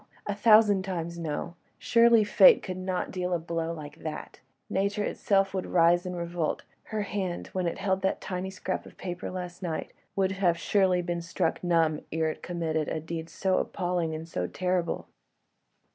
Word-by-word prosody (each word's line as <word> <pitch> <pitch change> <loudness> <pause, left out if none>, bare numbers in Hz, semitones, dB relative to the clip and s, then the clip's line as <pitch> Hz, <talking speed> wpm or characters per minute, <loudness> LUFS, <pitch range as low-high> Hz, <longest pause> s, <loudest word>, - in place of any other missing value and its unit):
a 205 - -1
thousand 210 -2 +5
times 170 -3 -4
no! 160 +1 -3 0.2
Surely 230 -1 +5
Fate 465 - +7
could 185 - -4
not 185 0 -2
deal 180 -1 -2
a - - +2
blow 165 0 -3
like 150 -2 -8
that: 155 -2 -7 0.3
Nature 200 +2 0
itself 195 -2 +1
would 190 -1 -2
rise 175 +1 +4
in 180 - -4
revolt: 170 -2 -2 0.2
her 215 -1 -2
hand, 190 -4 -3
when 185 -2 0
it 170 - -2
held 190 -1 0
that 190 - 0
tiny 185 0 -4
scrap 190 0 -4
of - - -16
paper 180 -1 -5
last 180 -1 -6
night, 165 -4 -4 0.2
would 195 0 +1 0.2
surely 185 +1 +2
have 175 - -2
been 170 -1 -2
struck 170 +1 -1
numb 165 -3 +2
ere 160 0 +1
it - - -10
committed 160 -3 -2
a 160 - -2
deed 160 +1 -5
so 190 -1 +1
appalling 175 -4 -1
and 160 +1 -6
so 90 - -2
terrible. 180 - -1
180 Hz, 175 wpm, -28 LUFS, 165-190 Hz, 0.3 s, Fate